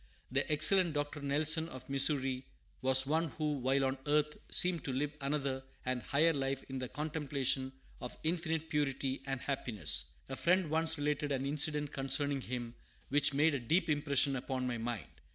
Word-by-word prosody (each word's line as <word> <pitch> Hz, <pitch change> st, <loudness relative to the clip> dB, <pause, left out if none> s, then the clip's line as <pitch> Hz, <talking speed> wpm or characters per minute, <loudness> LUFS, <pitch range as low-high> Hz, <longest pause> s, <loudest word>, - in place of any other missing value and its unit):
The 135 Hz, +3 st, 0 dB
excellent 165 Hz, +2 st, +4 dB
Dr. 145 Hz, 0 st, -2 dB
Nelson, 155 Hz, +3 st, +2 dB
of 130 Hz, -4 st, -9 dB
Missouri, 135 Hz, -2 st, +1 dB, 0.4 s
was 130 Hz, +1 st, +4 dB
one 160 Hz, +4 st, +1 dB
who, 150 Hz, -2 st, -1 dB
while 135 Hz, +2 st, +2 dB
on 130 Hz, 0 st, -1 dB
earth, 150 Hz, 0 st, +2 dB
seemed 175 Hz, -3 st, +5 dB
to 135 Hz, -, -2 dB
live 145 Hz, +3 st, -2 dB
another 140 Hz, -1 st, -1 dB, 0.2 s
and 130 Hz, -1 st, -1 dB
higher 155 Hz, +6 st, +3 dB
life 135 Hz, -1 st, -2 dB
in 135 Hz, -1 st, -5 dB
the 125 Hz, -1 st, -4 dB
contemplation 140 Hz, -3 st, -1 dB, 0.3 s
of 125 Hz, -, -6 dB
infinite 160 Hz, -1 st, -1 dB
purity 135 Hz, -3 st, -1 dB
and 135 Hz, -1 st, -2 dB
happiness. 110 Hz, -, 0 dB, 0.2 s
A 135 Hz, -, -5 dB
friend 175 Hz, +1 st, +2 dB
once 160 Hz, 0 st, +1 dB
related 145 Hz, 0 st, -1 dB
an 135 Hz, -1 st, -1 dB
incident 150 Hz, 0 st, 0 dB
concerning 135 Hz, +1 st, 0 dB
him 120 Hz, -2 st, -5 dB, 0.4 s
which 145 Hz, 0 st, +2 dB
made 155 Hz, +2 st, +4 dB
a 140 Hz, -, 0 dB
deep 165 Hz, +9 st, +1 dB
impression 145 Hz, -2 st, +2 dB
upon 130 Hz, 0 st, -3 dB
my 120 Hz, -2 st, -2 dB
mind. 115 Hz, -7 st, -3 dB
140 Hz, 170 wpm, -33 LUFS, 130-150 Hz, 0.4 s, seemed